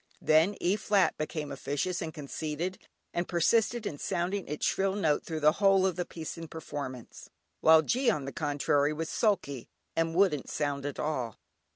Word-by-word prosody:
Then 160 +6 +4
E 180 +3 +2
flat 205 -3 +2
became 155 -1 -4
officious 145 +6 -2
and 165 -2 -3
conceited, 155 +4 -4 0.3
and 175 0 -1
persisted 225 +6 +2
in 145 -7 -4
sounding 185 +2 -2
its 150 +1 -2
shrill 195 0 +1
note 160 -7 +1
through 160 -2 -4
the 150 +1 +6
whole 195 -1 +5
of 185 -3 +1
the 180 0 -2
piece 165 0 -7
in 165 - -7
performance, 140 -6 -7 0.3
while 160 0 +6
G 250 - +2
on 150 -11 0
the 135 - -4
contrary 145 -2 +1
was 160 +1 -4
sulky, 140 - 0 0.3
and 165 0 0
wouldn't 180 -7 +2
sound 145 -1 -2
at 145 - -5
all. 130 -8 -2
160 Hz, 175 wpm, -30 LUFS, 145-185 Hz, 0.3 s, the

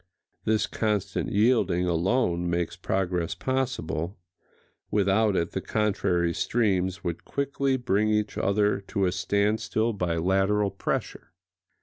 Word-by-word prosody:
This 110 -1 +2
constant 105 -3 -1
yielding 105 -5 +3
alone 90 0 +1
makes 85 -1 -1
progress 90 -3 -1
possible: 125 -10 -2 0.7
without 105 +1 +2
it 85 -2 0
the - - -3
contrary 90 -5 0
streams 95 -4 0
would 85 -1 -3
quickly 140 -1 -1
bring 110 -4 +1
each 105 0 0
other 105 0 +1
to 100 -2 0
a 90 - +1
standstill 105 +4 0
by 90 -4 -1
lateral 95 +4 +2
pressure. 95 -1 -4
100 Hz, 115 wpm, -26 LUFS, 90-110 Hz, 0.7 s, yielding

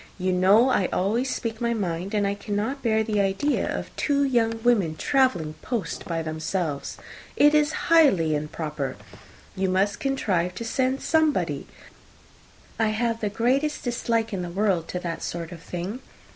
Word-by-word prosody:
You 185 0 0
know 200 +7 +5
I 195 -7 +2
always 225 +8 0
speak 225 -2 -3
my 235 0 +1
mind, 185 -1 -3
and 205 -1 +2
I 200 - +1
cannot 210 +6 -3
bear 220 -3 +2
the 210 -2 0
idea 195 +9 0
of - - -5
two 285 -1 +1
young 230 -4 +1
women 205 -10 +3
travelling 185 - +1
post 230 -9 -3
by 165 -1 -2
themselves. 155 -1 -3 0.4
It 295 +1 +5
is 300 0 +2
highly 195 - +5
improper. 150 -1 -3 0.6
You 190 0 0
must 195 +2 +1
contrive 185 -10 0
to 230 - -5
send 260 +3 0
somebody. 315 -1 +1 1.1
I 225 - +3
have 225 +1 0
the 210 - 0
greatest 265 +8 0
dislike 230 -2 -1
in 190 - -2
the 175 - -4
world 185 -3 0
to 180 - -3
that 170 -2 -4
sort 170 0 -5
of 170 -2 -9
thing. 180 +8 -5
205 Hz, 160 wpm, -25 LUFS, 180-245 Hz, 1.1 s, know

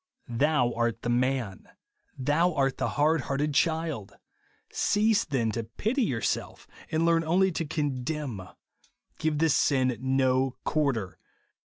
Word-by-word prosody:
" - - -46
Thou 125 0 +1
art 115 -1 -1
the 120 - 0
man." 125 -5 -1 0.5
Thou 155 +6 +1
art 135 -2 0
the - - 0
hard 155 +1 +3
hearted 145 +3 -1
child 160 - 0
1 100 - -24 0.5
Cease 215 +1 +2
then 120 -7 0
to 115 0 -4
vity 250 +6 0
youxself, 115 -3 -2 0.2
and 160 +1 +1
learn 165 0 +3
only 185 +4 +2
to 165 -1 -3
conderan. 140 - -3 0.7
Give 155 -1 0
this 160 -1 +3
sin 130 -3 +2
no 130 -1 +1
quarter. 135 - -1
140 Hz, 135 wpm, -27 LUFS, 125-160 Hz, 0.7 s, hard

